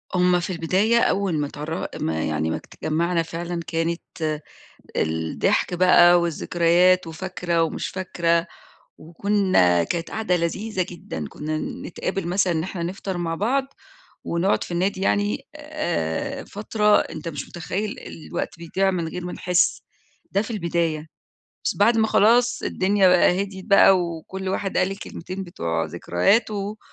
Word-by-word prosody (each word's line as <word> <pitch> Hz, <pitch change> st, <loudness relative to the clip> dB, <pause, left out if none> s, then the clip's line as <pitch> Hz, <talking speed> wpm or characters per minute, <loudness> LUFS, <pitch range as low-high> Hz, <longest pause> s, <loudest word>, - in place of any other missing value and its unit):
هم 180 Hz, 0 st, +4 dB
في 175 Hz, -, -4 dB
البداية 190 Hz, +8 st, +2 dB
أول 195 Hz, -5 st, +1 dB
ما 145 Hz, -, -1 dB
اتعرّ 150 Hz, +4 st, -4 dB
ما 80 Hz, 0 st, -1 dB
يعني 80 Hz, +1 st, -1 dB
ما -, -, -1 dB
ات -, -, -8 dB
اتجمعنا 170 Hz, +2 st, 0 dB
فعلًا 170 Hz, +1 st, -4 dB
كانت 165 Hz, -2 st, -2 dB, 0.6 s
الضحك 80 Hz, -, 0 dB
بقى 175 Hz, -1 st, +6 dB
والذكريات 175 Hz, +2 st, +3 dB
وفاكرة 170 Hz, 0 st, -2 dB
ومش 165 Hz, -, -2 dB
فاكرة 170 Hz, -2 st, 0 dB, 0.5 s
وكنا، 170 Hz, -, +2 dB
كانت 170 Hz, -, -3 dB
قعدة 220 Hz, -5 st, 0 dB
لذيذة 185 Hz, +3 st, -1 dB
جدًا، 80 Hz, -, -6 dB
كنا 155 Hz, +1 st, -4 dB, 0.3 s
نتقابل 180 Hz, 0 st, -3 dB
مثلًا 185 Hz, 0 st, +2 dB
إن 160 Hz, -1 st, -1 dB
إحنا 180 Hz, -1 st, -4 dB
نفطر 185 Hz, +1 st, -4 dB
مع 165 Hz, -1 st, -2 dB
بعض 260 Hz, +9 st, +1 dB, 0.6 s
ونقعد 170 Hz, +4 st, +1 dB
في -, -, -11 dB
النادي 190 Hz, +2 st, 0 dB
يعني 205 Hz, +6 st, 0 dB
آآ، 295 Hz, -, -3 dB
فترة 210 Hz, 0 st, +2 dB
أنت 170 Hz, -, -5 dB
مش 145 Hz, -4 st, -6 dB
متخيّل 195 Hz, +5 st, -4 dB
الوقت 165 Hz, +1 st, -6 dB
بيضيع 190 Hz, +3 st, 0 dB
من 170 Hz, -3 st, -2 dB
غير 180 Hz, +1 st, -6 dB
ما 180 Hz, -, -4 dB
نحس، 180 Hz, -1 st, +1 dB, 0.5 s
ده 200 Hz, -, +1 dB
في 220 Hz, -, -8 dB
البداية، 170 Hz, -6 st, -1 dB, 0.6 s
بس -, -, 0 dB
بعد 230 Hz, 0 st, +4 dB
ما 220 Hz, -1 st, +3 dB
خلاص 240 Hz, +4 st, +3 dB
الدنيا 195 Hz, 0 st, +2 dB
بقى 180 Hz, +1 st, +4 dB
هديت 190 Hz, -1 st, -6 dB
بقى 195 Hz, -2 st, +6 dB
وكُلّ 175 Hz, +3 st, -4 dB
واحد 195 Hz, 0 st, -2 dB
قال 185 Hz, +1 st, +2 dB
الكلمتين 195 Hz, -1 st, -6 dB
بتوع 85 Hz, -, -2 dB
ذكرياته 200 Hz, -, 0 dB
180 Hz, 145 wpm, -23 LUFS, 165-195 Hz, 0.6 s, بقى